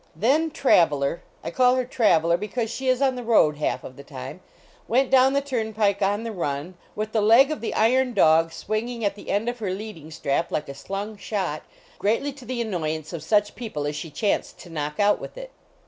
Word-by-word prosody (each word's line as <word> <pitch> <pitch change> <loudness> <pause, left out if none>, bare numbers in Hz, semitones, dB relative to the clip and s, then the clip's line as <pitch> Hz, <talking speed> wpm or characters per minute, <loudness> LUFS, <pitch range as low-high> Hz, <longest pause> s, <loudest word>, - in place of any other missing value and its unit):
Then 275 - +2
Traveler 165 - +2 0.2
I - - -4
call 250 0 +4
her 255 -1 0
Traveler 170 -9 +3
because 215 +5 -3
she 265 +3 -4
is 255 +1 +3
on 265 -1 +3
the 250 - -5
road 185 -10 +4
half 150 - -1
of 130 - -10
the 140 - -10
time 140 +6 -8 0.5
went 255 +3 +2
down 265 0 +5
the 280 - +2
turnpike 220 -6 0
on 205 +3 +1
the 230 - -4
run, 150 -3 -3 0.2
with 215 +1 -3
the 220 - +1
leg 235 +7 +6
of 310 - -4
the 230 - -3
iron 250 +2 +2
dog 165 -2 +4
swinging 220 +5 -3
at 200 - +1
the 205 - -11
end 205 +3 0
of 245 0 -2
her 210 -4 -2
leading 185 -5 -6
strap 160 +1 -1
like 150 - -2
a - - -5
slung 200 +9 -5
shot, 190 -7 -3 0.4
greatly 230 +7 0
to 265 -2 -13
the 245 0 -3
annoyance 160 -6 -3
of 165 - -4
such 205 +6 +2
people 210 -11 -5
as 145 0 -2
she 160 - -5
chanced 200 +7 -1
to 175 - -12
knock 150 -1 -4
out 205 0 +4
with - - -9
it. - - -8
210 Hz, 215 wpm, -24 LUFS, 165-245 Hz, 0.5 s, leg